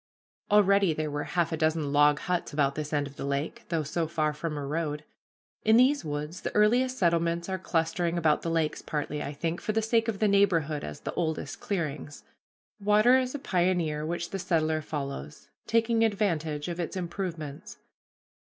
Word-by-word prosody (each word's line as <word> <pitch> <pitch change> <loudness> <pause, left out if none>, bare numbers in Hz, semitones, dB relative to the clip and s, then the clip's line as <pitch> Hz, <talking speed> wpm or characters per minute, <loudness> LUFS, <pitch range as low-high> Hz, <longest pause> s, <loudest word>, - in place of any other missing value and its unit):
Already 200 -4 +4
there 155 -1 -2
were 145 0 -3
half 170 -2 0
a 160 - -1
dozen 155 -2 0
log 145 0 +5
huts 180 -1 -2
about 140 -2 +1
this 150 0 -5
end 145 -2 +1
of 140 0 -11
the - - -5
lake, 140 +2 -3
though 165 -2 0
so 160 +3 -2
far 155 -2 0
from 150 0 -4
a 145 - -4
road. 150 0 -2 0.6
In 220 +1 +5
these 270 +4 +4
woods 150 +3 -4
the - - -2
earliest 245 +5 +3
settlements 170 -2 +1
are 190 -1 -2
clustering 170 -1 0
about 155 -3 +2
the 165 - -3
lakes, 165 -2 0
partly, 150 0 -3
I - - -4
think, 165 +4 -3
for 215 - -2
the 225 - +2
sake 225 0 +2
of 225 -3 -1
the 215 - +2
neighborhood 170 -7 +2
as 75 0 -7
the - - -4
oldest 160 -4 -2
clearings. 150 -6 -4 0.6
Water 210 +5 +5
is 255 +1 -2
a - - -1
pioneer 175 - 0
which 170 +2 -3
the 195 - -3
settler 160 -3 +1
follows, 140 - -6 0.2
taking 230 0 +2
advantage 165 -9 0
of 175 0 -4
its 175 +2 -3
improvements. 170 -5 -5
165 Hz, 185 wpm, -28 LUFS, 150-195 Hz, 0.6 s, log